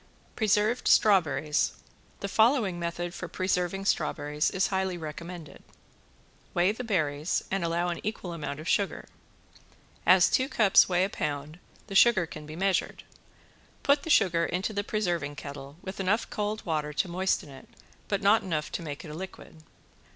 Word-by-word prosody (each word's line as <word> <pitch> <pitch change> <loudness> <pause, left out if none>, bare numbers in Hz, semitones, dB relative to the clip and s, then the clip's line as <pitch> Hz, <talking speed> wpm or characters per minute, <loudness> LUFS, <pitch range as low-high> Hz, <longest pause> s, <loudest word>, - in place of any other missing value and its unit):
~PRESERVED 215 +2 +1
STRAWBERRIES~ 155 -8 +3 0.5
The 200 - -2
following 220 -4 +2
method 170 0 -3
for 180 - -6
preserving 185 +1 -1
strawberries 150 -6 0
is 190 0 0
highly 190 -2 -1
recommended. 165 0 -8 0.9
Weigh 175 +3 +3
the 225 +4 -6
berries 155 -7 0
and 195 -1 0
allow 170 +1 0
an 170 - -3
equal 200 -4 -4
amount 150 -3 -5
of 155 - -8
sugar. 200 -2 0 1.0
As 180 -1 +6
two 260 +1 +1
cups 205 -4 +5
weigh 180 0 +2
a 195 - 0
pound, 150 +2 -4 0.3
the 200 - -9
sugar 195 -2 +5
can 155 -2 -10
be 155 - -8
measured. 190 +2 0 0.8
Put 285 0 +4
the 325 - -7
sugar 170 - +4
into 185 +5 -2
the 205 0 -1
preserving 175 -9 -2
kettle 140 0 -9
with 190 +1 -7
enough 195 +4 +1
cold 210 +1 -3
water 150 -2 -2
to 165 - 0
moisten 180 -3 -1
it, 135 -1 -13 0.4
but 200 -1 -1
not 205 +3 +5
enough 155 -5 -3
to - - -4
make 150 -2 -7
it 155 - -8
a - - -7
liquid. 185 -1 -9
180 Hz, 160 wpm, -28 LUFS, 155-200 Hz, 1.0 s, As